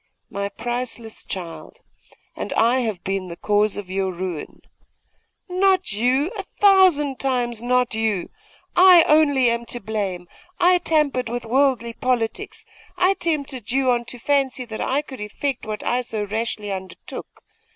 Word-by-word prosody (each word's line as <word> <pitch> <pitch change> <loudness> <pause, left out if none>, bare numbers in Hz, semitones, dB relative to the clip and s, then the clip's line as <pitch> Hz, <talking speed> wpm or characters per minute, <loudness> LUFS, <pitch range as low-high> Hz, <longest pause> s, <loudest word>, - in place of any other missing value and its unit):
'My 200 0 -3
priceless 235 +1 -4
child! 175 -3 -7 0.5
And - - -5
I 235 +3 +3
have 220 -7 -3
been 195 -1 -2
the 170 - -7
cause 210 0 +1
of 205 -2 -6
your 190 0 -1
ruin!' 180 -3 -6 0.8
'Not 370 - +2
you! 255 - +1
a 405 - -3
thousand 370 -9 +3
times 245 -4 -1
not 250 0 +1
you! 220 -5 -1 0.4
I 360 -2 +8
only 285 -5 +4
am 235 0 -2
to 240 - -2
blame! 195 -5 -3 0.3
I 360 0 +5
tampered 300 -8 +1
with 240 0 -4
worldly 245 -1 +1
politics. 245 -3 -2 0.3
I 365 +2 +4
tempted 280 - -3
you 260 0 +2
on 240 -1 0
to 245 - -7
fancy 270 0 0
that 220 -2 -6
I 280 +3 0
could 260 -6 -10
effect 240 +4 -3
what 215 -1 -4
I 245 +1 +1
so 220 -4 -3
rashly 210 0 -3
undertook. 190 -1 -8
240 Hz, 150 wpm, -22 LUFS, 210-280 Hz, 0.8 s, I